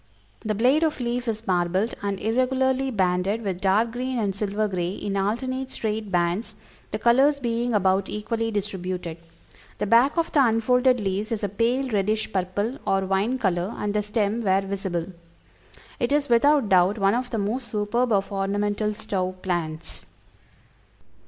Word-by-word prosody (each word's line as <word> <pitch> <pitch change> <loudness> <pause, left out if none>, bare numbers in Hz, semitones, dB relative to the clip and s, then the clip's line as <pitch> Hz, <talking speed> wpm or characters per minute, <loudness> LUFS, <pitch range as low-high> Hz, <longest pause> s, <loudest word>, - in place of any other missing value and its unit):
The 215 -2 -1
blade 255 +8 +3
of 315 -3 0
leaf 245 0 -2
is 220 0 -3
marbled 185 +4 +1
and 200 -1 -2
irregularly 260 +3 +1
banded 190 0 0
with 190 -3 -3
dark 210 +4 +2
green 255 +2 -3
and 205 -4 0
silver 210 +1 -1
gray 180 -2 -2
in 200 0 -4
alternate 255 +7 -1
straight 215 -4 -3
bands, 175 +4 0 0.3
the - - -3
colors 270 +5 +4
being 235 -2 -1
about 190 -1 +2
equally 225 +2 -2
distributed. 185 -5 -4 0.6
The - - -1
back 235 - +4
of 335 0 0
the 290 -4 +4
unfolded 250 +2 +3
leaves 205 +2 -2
is 220 -2 -2
a 205 - 0
pale 235 +7 0
reddish 215 +1 -1
purple 200 +7 -2
or 195 0 +2
wine 195 +7 0
color, 190 -3 -1
and 205 -1 -2
the 210 - +1
stem, 210 +1 -1
where 195 -2 +2
visible. 190 -3 -3 0.9
It 240 -1 0
is, 290 -1 +1
without 275 +2 +4
doubt, 185 +2 +4
one 195 -1 +3
of 245 +1 -1
the 230 - -3
most 225 +5 -2
superb 230 +3 0
of 200 -1 +1
ornamental 205 +2 -1
stove 185 -3 -3
plants." 170 -3 -4
210 Hz, 160 wpm, -24 LUFS, 195-240 Hz, 0.9 s, colors